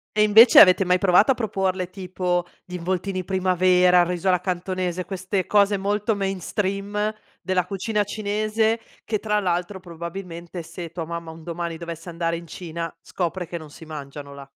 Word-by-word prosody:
E 210 Hz, -, +5 dB
invece 220 Hz, +3 st, +8 dB
avete 185 Hz, 0 st, +8 dB
mai 180 Hz, 0 st, +3 dB
provato 195 Hz, +6 st, +5 dB
a -, -, +5 dB
proporle 190 Hz, -5 st, -1 dB
tipo 180 Hz, -2 st, -2 dB, 0.2 s
gli 180 Hz, -, -12 dB
involtini 185 Hz, +2 st, -2 dB
primavera, 180 Hz, -1 st, +4 dB
riso 180 Hz, +1 st, -2 dB
alla 180 Hz, -1 st, +3 dB
cantonese, 185 Hz, -1 st, -2 dB
queste 190 Hz, 0 st, -3 dB
cose 205 Hz, -1 st, +4 dB
molto 205 Hz, +2 st, 0 dB
mainstream 200 Hz, +2 st, -2 dB, 0.3 s
della 180 Hz, 0 st, 0 dB
cucina 205 Hz, +3 st, -1 dB
cinese, 215 Hz, +2 st, 0 dB, 0.2 s
che 215 Hz, -2 st, -1 dB
tra 210 Hz, 0 st, 0 dB
l'altro, 180 Hz, 0 st, -2 dB
probabilmente, 170 Hz, 0 st, -7 dB
se 170 Hz, 0 st, -8 dB
tua 170 Hz, -1 st, -5 dB
mamma 170 Hz, 0 st, -6 dB
un 160 Hz, 0 st, -12 dB
domani 170 Hz, 0 st, -4 dB
dovesse 170 Hz, +1 st, -7 dB
andare 165 Hz, 0 st, -1 dB
in 170 Hz, +1 st, -7 dB
Cina 165 Hz, 0 st, -6 dB
scopre 180 Hz, 0 st, -3 dB
che 170 Hz, -, -5 dB
non 155 Hz, -2 st, -10 dB
si 160 Hz, +2 st, -13 dB
mangiano 145 Hz, -2 st, -8 dB
là. 140 Hz, 0 st, -10 dB
180 Hz, 165 wpm, -23 LUFS, 170-200 Hz, 0.3 s, invece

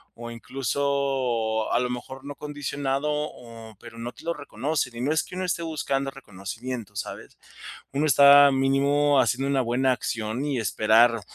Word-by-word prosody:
o 120 Hz, 0 st, -8 dB
incluso, 130 Hz, -3 st, -1 dB
a 120 Hz, -, +3 dB
lo 125 Hz, -, -1 dB
mejor 130 Hz, +2 st, -7 dB
no 145 Hz, 0 st, -7 dB
condicionado, 145 Hz, -1 st, -3 dB
o 115 Hz, -7 st, -6 dB
pero 120 Hz, -1 st, -12 dB
no 120 Hz, +1 st, -5 dB
te -, -, -16 dB
lo 170 Hz, -, 0 dB
reconocen. 145 Hz, -2 st, -3 dB
Y 120 Hz, -, -5 dB
no 140 Hz, +4 st, 0 dB
es 160 Hz, -, +2 dB
que -, -, -13 dB
uno 185 Hz, -, -3 dB
esté 170 Hz, -1 st, -1 dB
buscando 140 Hz, -4 st, -2 dB
reconocimiento, 110 Hz, -1 st, -7 dB
¿sabes? 100 Hz, -, -7 dB, 0.6 s
Uno 145 Hz, +3 st, +1 dB
está 140 Hz, 0 st, +8 dB
mínimo 140 Hz, +2 st, +3 dB
haciendo 130 Hz, +3 st, 0 dB
una 135 Hz, -1 st, +2 dB
buena 125 Hz, +2 st, +1 dB
acción 115 Hz, +2 st, -3 dB
y 145 Hz, -3 st, -1 dB
esperar 115 Hz, +2 st, +3 dB
135 Hz, 165 wpm, -25 LUFS, 115-140 Hz, 0.6 s, está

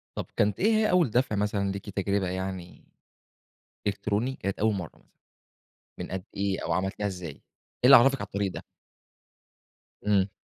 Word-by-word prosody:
طب -, -, -3 dB
كانت 105 Hz, -1 st, +1 dB
إيه 220 Hz, +4 st, +3 dB
هي 215 Hz, 0 st, +3 dB
أول 180 Hz, -8 st, +4 dB
دفع 120 Hz, -1 st, +1 dB
مثلًا 100 Hz, -1 st, 0 dB
ليكِ 100 Hz, +1 st, -6 dB
تجربة 100 Hz, -1 st, 0 dB
يعني 95 Hz, -1 st, -5 dB, 1.0 s
إلكتروني، 105 Hz, +5 st, -1 dB
كانت 100 Hz, +1 st, -3 dB
أول 110 Hz, 0 st, +2 dB
مرة 90 Hz, -5 st, -6 dB
مثلًا -, -, -29 dB, 0.9 s
من -, -, -6 dB
قد 95 Hz, 0 st, -4 dB
إيه 100 Hz, -1 st, -1 dB
أو -, -, -1 dB
عملتيها 95 Hz, +2 st, -1 dB
إزاي، 90 Hz, -4 st, -5 dB
إيه 70 Hz, -, -15 dB, 0.4 s
اللي 135 Hz, +2 st, +10 dB
عرفِك 135 Hz, +2 st, +5 dB
على 100 Hz, -, -3 dB
الطريق 100 Hz, -1 st, -2 dB
ده؟ -, -, -8 dB, 1.4 s
امم. 100 Hz, -2 st, +2 dB
100 Hz, 160 wpm, -27 LUFS, 95-110 Hz, 1.4 s, اللي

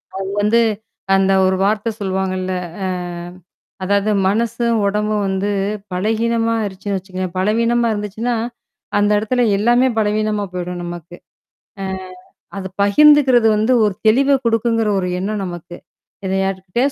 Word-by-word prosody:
அவங்க 195 Hz, 0 st, -4 dB
வந்து 220 Hz, +3 st, +3 dB, 0.5 s
அந்த 195 Hz, 0 st, +3 dB, 0.2 s
ஒரு 190 Hz, -, +2 dB
வார்த்த 215 Hz, +2 st, 0 dB
சொல்லவாங்கல்ல. 185 Hz, -1 st, -2 dB, 0.3 s
அ. -, -, 0 dB, 1.0 s
அதாவது 200 Hz, +2 st, +1 dB, 0.2 s
மனசும், 230 Hz, +3 st, 0 dB
உடம்பும் 210 Hz, +1 st, 0 dB
வந்து 190 Hz, +1 st, -1 dB, 0.4 s
பலகீனமா 225 Hz, +4 st, 0 dB
ஆயிருச்சுன்னு 200 Hz, -1 st, -3 dB
வச்சுக்கோங்களேன். 185 Hz, -1 st, -6 dB
பலகீனமா 230 Hz, +5 st, +2 dB
இருந்துச்சுன்னா, 215 Hz, +3 st, -2 dB, 0.6 s
அந்த 205 Hz, 0 st, +3 dB
இடத்துல 220 Hz, +4 st, 0 dB, 0.2 s
எல்லாமே 240 Hz, +5 st, +3 dB
பலவீனமா 215 Hz, -1 st, 0 dB
போயிடும் 180 Hz, 0 st, -4 dB
நமக்கு. 175 Hz, 0 st, -8 dB, 0.7 s
அ. -, -, -3 dB, 0.7 s
அது 190 Hz, -1 st, -4 dB
பகிர்ந்துக்கிறது 260 Hz, +2 st, +5 dB
வந்து 220 Hz, +4 st, +2 dB
ஒரு 210 Hz, -2 st, +2 dB
தெளிவ 275 Hz, +5 st, +4 dB
கொடுக்குங்கிற 225 Hz, -1 st, +1 dB
ஒரு 180 Hz, -, -2 dB
எண்ணம் 205 Hz, +2 st, -2 dB
நமக்கு. 175 Hz, -1 st, -8 dB, 0.5 s
இத 190 Hz, -, -1 dB
யார்கிட்டயாவது 195 Hz, +8 st, -1 dB
210 Hz, 120 wpm, -18 LUFS, 190-230 Hz, 1.0 s, பகிர்ந்துக்கிறது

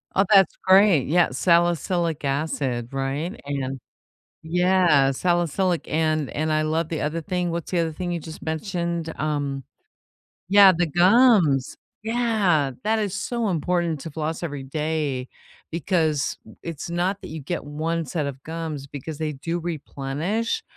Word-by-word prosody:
Oh, 195 Hz, -, +4 dB
that's 195 Hz, -2 st, +6 dB
great. 190 Hz, -7 st, +5 dB
Yeah, 175 Hz, +3 st, +3 dB
salicylic 170 Hz, +1 st, +1 dB
acid, 135 Hz, -4 st, -1 dB
right, 135 Hz, +6 st, -3 dB
and 135 Hz, -2 st, -3 dB, 0.6 s
Yeah, 175 Hz, -5 st, +3 dB
salicylic, 175 Hz, +3 st, 0 dB
and 155 Hz, -2 st, 0 dB
and 155 Hz, +1 st, -1 dB
I 155 Hz, -, +2 dB
love 160 Hz, +1 st, -1 dB
the 160 Hz, -, -3 dB
other 160 Hz, +3 st, -2 dB
thing. 180 Hz, -1 st, -2 dB
What's 170 Hz, +1 st, -4 dB
the 175 Hz, -, +1 dB
other 165 Hz, -1 st, 0 dB
thing 175 Hz, +2 st, -4 dB
you 170 Hz, -, -2 dB
just 160 Hz, 0 st, -10 dB
mentioned, 170 Hz, 0 st, -3 dB
um 145 Hz, -3 st, -2 dB, 0.9 s
Yeah, 200 Hz, -1 st, +8 dB
the 175 Hz, -2 st, +2 dB
gums. 180 Hz, -, +4 dB, 0.3 s
Yeah, 215 Hz, -, +1 dB
that 220 Hz, +1 st, +2 dB
is 205 Hz, -3 st, -1 dB
so 235 Hz, -1 st, -2 dB
important 170 Hz, -2 st, 0 dB
to 165 Hz, -, -6 dB
floss 160 Hz, +2 st, -3 dB
every 145 Hz, -5 st, -4 dB
day 150 Hz, -2 st, -2 dB, 0.4 s
because 160 Hz, -4 st, 0 dB, 0.3 s
it's 165 Hz, -1 st, -6 dB
not 180 Hz, +3 st, -1 dB
that -, -, -8 dB
you 160 Hz, -, -6 dB
get 160 Hz, +4 st, -4 dB
1 160 Hz, +3 st, -2 dB
set 150 Hz, +2 st, -2 dB
of 135 Hz, -1 st, -6 dB
gums 160 Hz, -4 st, -5 dB
because 145 Hz, +2 st, -7 dB
they 155 Hz, -1 st, -1 dB
do 165 Hz, +5 st, -3 dB
replenish 170 Hz, -, -3 dB
165 Hz, 145 wpm, -24 LUFS, 145-180 Hz, 0.9 s, Yeah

